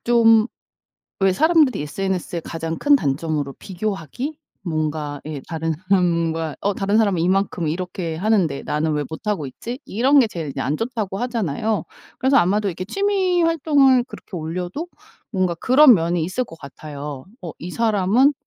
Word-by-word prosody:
좀 225 -2 +5 0.7
왜 195 -1 +4
사람들이 310 - +3
SNS의 180 +1 -3
가장 165 0 -4
큰 290 0 +4
단점으로 145 - 0
비교하기? 205 - -4 0.2
뭔가 155 -4 -2
예 150 -3 -5
다른 165 -1 -2 0.2
사람과 170 -4 +1
'어 200 0 0
다른 200 +2 0
사람은 200 -6 +2
이만큼 185 -1 +1
이렇게 170 0 -3
하는데 180 -6 +1
나는 155 +1 -1
왜 150 0 0
못하고 180 +1 -3
있지?' 240 - -7
이런 265 +6 +4
게 230 - +3
제일 160 -8 -5
그냥 135 -1 -3
안 150 - 0
좋다고 220 -5 -3
하잖아요. 220 - -1 0.4
그래서 265 +2 +3
아마도 200 +4 +3
이렇게 185 +1 -4
취미 380 - +1
활동을 285 -6 +4
그렇게 215 -6 -10
올려도 180 - -4 0.5
뭔가 185 -3 0
그런 260 - +7
면이 170 -2 0
있을 185 +10 -1
것 165 - -12
같아요. 145 -1 -8 0.2
어 170 - -5
이 175 +1 -7
사람은 225 +5 +3
185 Hz, 340 characters per minute, -21 LUFS, 160-235 Hz, 0.7 s, 그런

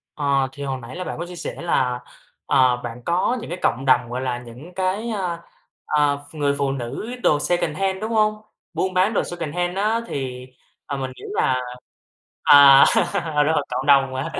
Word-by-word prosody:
Ờ, 140 -2 +1
thì 140 +1 -8
hồi 135 -1 -3
nãy 120 +2 -9
là 185 - -4
bạn - - -5
có 170 - -3
chia 180 0 -10
sẻ - - -6
là, 125 -7 0 0.5
ờ, 130 -3 +3
bạn 120 0 -7
có 185 +8 +1
những - - -8
cái 175 - -5
cộng 130 +3 0
đồng 125 -2 +3
gọi 125 +2 -3
là 125 -2 -2
những 125 +8 -12
cái, 190 +5 -1
ờ, 185 -6 -3 0.5
ờ, 145 -1 +2
ph - - -15
người 145 -1 0
phụ 140 -1 0
nữ 135 - -5
đồ 150 - +3
secondhand, 175 +4 -1
đúng 220 +1 -3
hông? 215 -1 +1 0.3
Buôn 185 0 -1
bán 185 +4 +2
đồ - - +1
secondhand 175 +2 -3
á 215 +3 +1
thì, 130 -2 -5 0.4
à, 140 - -3
mình 130 -1 -4
nghĩ - - -14
là 130 -1 +1 0.8
à, 140 -1 +8 0.6
đúng 160 - +2
rồi, 145 -2 +1
cộng 130 +2 -3
đồng 135 -2 +4
hả? 165 +5 -3
145 Hz, 195 wpm, -22 LUFS, 130-180 Hz, 0.8 s, à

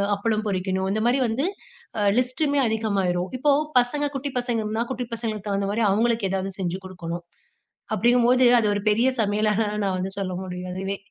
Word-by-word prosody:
அப்பளம் 215 +1 -1
பொரிக்கணும். 190 -1 -1
இந்த 215 - 0
மாரி 250 +3 +3
வந்து, 235 +6 -1 0.5
அ - - 0 0.2
லிஸ்ட்டுமே 280 +3 +1
அதிகமாயிரும். 195 -5 0
இப்போ 290 +3 +3 0.3
பசங்க 290 +4 0
குட்டி 275 +1 -3
பசங்க 240 -2 -1
இருந்தா, 220 +2 -1
குட்டி 250 -1 -3
பசங்களுக்கு 220 -3 -4
தகுந்த 200 0 0
மாரி 225 +3 0
அவுங்களுக்கு 225 0 +1
ஏதாவது 195 0 -2
செஞ்சு 185 0 -2
கொடுக்கணும், 175 -2 -6 0.7
அப்டிங்கும்போது 245 +1 +4 0.2
அது 210 - +1
ஒரு 205 - -3
பெரிய 230 +5 +3
சமையலாக 210 +1 +1 0.2
நான் 190 -1 0
வந்து 190 +1 -3
சொல்ல 185 -2 -2
முடியும். 180 0 -6
அதுவே! 195 +1 -3
215 Hz, 165 wpm, -24 LUFS, 190-240 Hz, 0.7 s, அப்டிங்கும்போது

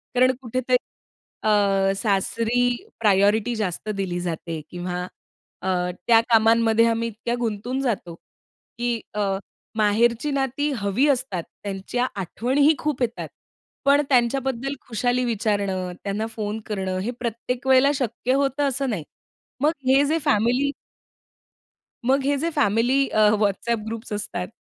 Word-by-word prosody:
कारण 255 +1 +5
कुठेतरी 255 +1 +1 0.7
अ, 200 -2 +3
सासरी 225 +4 0 0.4
प्रायोरिटी 210 +2 +3
जास्त 210 -1 -3
दिली 180 -2 -2
जाते 165 -2 -4
किंवा 180 0 -4 0.6
अ, - - -4 0.4
त्या 230 -1 +7
कामांमध्ये 225 0 +4
आम्ही 230 0 0
इतक्या 230 +2 -3
गुंतून 235 +3 -2
जातो 205 -10 -2 0.6
की 240 -1 -1
अ, 210 - -1 0.5
माहेरची 230 +6 +2
नाती 275 +1 0
हवी 205 +7 +1
असतात. 250 -10 0 0.2
त्यांच्या 200 +5 -2
आठवणीही 265 - +2
खूप 295 -4 -2
येतात. 235 -1 -1 0.6
पण 280 +1 +5
त्यांच्याबद्दल 265 +1 +1
खुशाली 245 +2 0
विचारणं, 200 -5 -1
त्यांना 205 +2 -2
फोन 215 0 -3
करणं 190 -3 -2
हे 235 - -2
प्रत्येक 245 +2 -3
वेळेला 265 +2 +6
शक्य 250 -1 -1
होतं 275 +1 +1
असं 275 0 -1
नाही. 200 -9 -2 0.6
मग 300 +2 +4 0.2
हे 270 +2 +5
जे 310 +3 +1
फॅमिली 245 +7 +2 1.3
मग 270 +2 +3
हे 285 +1 +2
जे 335 - 0
फॅमिली 240 +4 +2
अ, - - 0 0.2
WhatsApp 215 +2 0
ग्रुप्स 225 +1 -6
असतात 180 -3 -3
230 Hz, 125 wpm, -23 LUFS, 205-255 Hz, 1.3 s, त्या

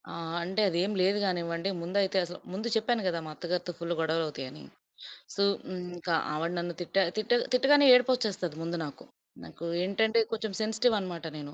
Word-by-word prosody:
ఆ! - - -8 0.3
అంటే, 190 +4 -1
అదేం 180 +4 0
లేదు 195 +3 +3
కానివ్వండి. 170 -1 -1
ముందైతే 190 +2 0
అసలు 175 +1 -9
ముందు 215 +5 -3
చెప్పాను 225 +1 +1
కదా! 170 -2 0
మా 155 - -7
అత్తగారితో 175 +1 -3
ఫుల్లు 170 0 -2
గొడవలవుతాయని. 155 - -2 0.7
సో, 200 - +2 0.3
హ్మ్. 185 -1 -4 0.2
ఇంక 175 +1 -7 0.2
ఆవిడ 165 +3 -1
నన్ను 175 0 -3
తిట్టా 190 +3 +1 0.2
తిట్ట 215 +1 -2 0.2
తిట్టగానే 285 +3 +6
ఏడుపొచ్చేస్తది 230 - +2
ముందు 170 +1 -3
నాకు. 145 - -10 0.4
నాకు 85 - -9 0.2
ఏంటంటే, 220 +4 +2
కొచెం 220 -1 -2
సెన్సిటివ్ 220 +2 +2
అనమాట 175 -3 -6
నేను. 145 -1 -8
185 Hz, 160 wpm, -29 LUFS, 170-215 Hz, 0.7 s, తిట్టగానే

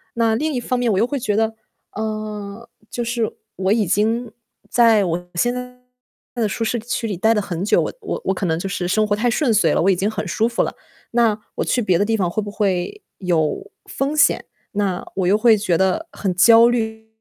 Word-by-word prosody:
那 230 -1 +2
另 305 +5 -1
一 250 - -1
方 250 +1 -2
面 245 -2 +1
我 195 - +1
又 215 - +3
会 280 +3 -3
觉 210 -4 -1
得， 225 +1 +1 0.4
啊， 215 0 -5 0.2
就 240 - -3
是 235 -2 -1 0.3
我 190 +1 +2
已 220 -2 +1
经 220 +6 0 0.4
在 225 -4 +5
我 175 +1 -3
现 240 +8 +1
在 250 0 -7 0.6
的 225 -3 0
舒 225 - -3
适 235 +1 -1
区 235 +1 -3
里 205 - -3
待 220 +5 +3
得 210 - +1
很 180 -3 -4
久， 205 - +3
我 - - -3
我 - - -4
我 190 - +1
可 190 - -3
能 160 -1 0
就 180 - -4
是 180 -2 -3
生 215 +4 +2
活 205 - +1
太 240 +3 +1
顺 240 0 +1
遂 170 -7 +3
了， - - +2
我 190 - +3
已 - - +2
经 195 +4 0
很 210 -2 -4
舒 220 +6 +1
服 235 - 0
了， - - -4 0.4
那 230 -3 +2 0.2
我 - - -1
去 - - +1
别 185 -5 +2
的 205 - +2
地 225 +1 +1
方 185 -4 0
会 215 - -2
不 205 - -6
会 200 - -1 0.2
有 180 - -1
风 280 +3 -2
险？ 290 - +4 0.3
那 195 -3 -1
我 185 -2 0
又 200 +3 +4
会 230 0 +5
觉 185 -5 +1
得 190 - 0
很 190 -3 -2
焦 230 +5 +7
虑。 220 -2 -2
215 Hz, 250 characters per minute, -20 LUFS, 190-235 Hz, 0.6 s, 焦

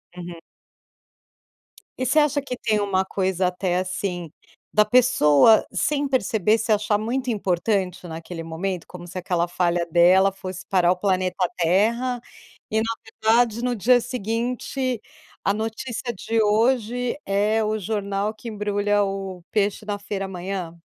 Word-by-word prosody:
Uhum. 175 -1 -8 1.6
E 255 - 0
você 270 +5 +4
acha 295 -1 +2
que 255 -2 -4
tem 215 -3 0
uma 195 -2 +1
coisa 190 -1 0
até, 180 0 -1
assim, 185 -3 -3 0.4
da 210 0 +4
pessoa 215 - +5
sem 290 -1 0
perceber 220 -4 +2
se 225 0 -1
achar 210 0 +2
muito 250 +4 -2
importante 190 -2 -1
naquele 165 +1 -7
momento, 170 +2 -4
como 175 -1 -10
se 180 +2 -8
aquela 175 -1 0
falha 175 0 0
dela 185 +3 +5
fosse 185 -1 -7
parar 180 -2 +3
o - - +2
planeta 185 -1 0 0.2
Terra, 230 +8 +1 0.5
e 220 - +1
na 225 +1 0 0.4
verdade, 235 0 +3
no 250 -1 0
dia 245 +4 +4
seguinte 245 +1 -2 0.4
a 200 - +2
notícia 225 +2 -4
de 225 +2 -2
hoje 235 +3 +1
é 210 +3 +1
o 215 0 -1
jornal 200 0 -2
que 225 +2 -8
embrulha 205 -1 0
o 195 -2 -4
peixe 205 -1 0
da 205 -1 -2
feira 200 -1 -4
amanhã. 180 -2 -5
205 Hz, 145 wpm, -23 LUFS, 185-230 Hz, 1.6 s, pessoa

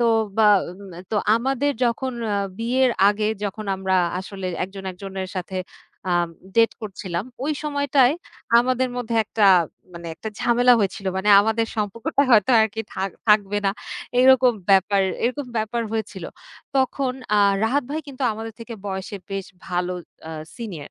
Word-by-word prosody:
তো 235 - +3 0.3
বা 220 -1 +5 0.4
মে 170 - -10
তো 220 - 0 0.2
আমাদের 270 +4 0
যখন 250 +2 -1 0.2
আ - - +1 0.2
বিয়ের 250 +3 +2 0.2
আগে 210 +1 0 0.2
যখন 205 +2 -4
আমরা 190 0 0 0.2
আসলে 190 0 -6 0.2
একজন 195 0 -10
একজনের 190 0 -6
সাথে 185 +1 -4 0.5
আ - - +2 0.4
ডেট 230 0 +5
করছিলাম, 190 -3 -4 0.2
ওই 305 - 0
সময়টায় 285 -2 +2 0.4
আমাদের 255 +1 +1
মধ্যে 240 -2 -3
একটা 210 0 +2 0.5
মানে 170 0 -9
একটা 220 - -6
ঝামেলা 245 +1 +4
হয়েছিল। 195 -1 -2
মানে 190 +2 -1
আমাদের 225 +2 +1
সম্পর্কটা 215 +5 0
হয়তো 220 -1 +5
আরকি 220 0 0
থাক 190 0 -2 0.2
থাকবে 205 -1 +4
না। 195 - +4 0.5
এইরকম 255 -1 +6 0.2
ব্যাপার 195 +1 +4 0.2
এরকম 260 +3 -1
ব্যাপার 220 +2 -1
হয়েছিল। 210 -5 -4 0.5
তখন 265 0 +1 0.2
আ - - +5 0.3
রাহাত 270 +6 +1
ভাই 310 +2 -2
কিন্তু 270 -1 -7
আমাদের 225 +1 -6
থেকে 230 0 -7
বয়সে 190 +1 -4
বেশ 195 -1 -3 0.2
ভালো 180 0 -1 0.4
আ - - -6 0.3
সিনিয়র। 185 -11 -7
220 Hz, 150 wpm, -23 LUFS, 195-250 Hz, 0.5 s, এইরকম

